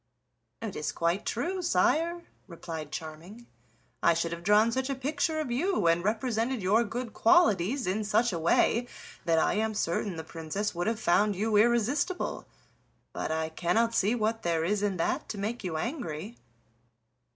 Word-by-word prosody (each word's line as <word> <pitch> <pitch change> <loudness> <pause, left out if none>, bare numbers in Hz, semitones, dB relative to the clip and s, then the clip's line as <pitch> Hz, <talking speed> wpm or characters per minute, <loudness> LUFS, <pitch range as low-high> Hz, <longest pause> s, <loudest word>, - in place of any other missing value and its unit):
"It 215 -4 -4
is 150 - -2
quite 170 +4 -1
true, 365 - -2
sire," 340 0 +1 0.2
replied 165 -4 -7
Charming; 165 +10 -8 0.6
"I 170 - +4
should 170 0 -1
have 170 0 -5
drawn 210 +4 +4
such 260 +3 -1
a 275 - -1
picture 290 +4 -1
of 295 -6 -3
you, 345 - 0
and 170 +1 +3
represented 230 +3 0
your 210 +5 +4
good 235 +2 -5
qualities 235 - +3
in 200 +4 -1
such 215 +1 +2
a 170 - -2
way, 225 +8 +2 0.4
that 165 -1 +3
I - - +3
am 220 0 -1
certain 185 0 -1
the 160 - -5
Princess 165 +6 -4
would 175 +3 -2
have 225 -1 0
found 205 +4 +2
you 215 +3 0
irresistible. 240 - +1 0.7
But - - -3
I 160 0 -1
cannot 180 +8 +1
see 220 +1 +2
what 225 0 -1
there 165 -1 0
is 205 +3 0
in 200 -3 0
that 165 - -1
to 215 - -5
make 215 +4 -3
you 170 -4 -3
angry." 215 - -4
210 Hz, 170 wpm, -29 LUFS, 170-240 Hz, 0.7 s, I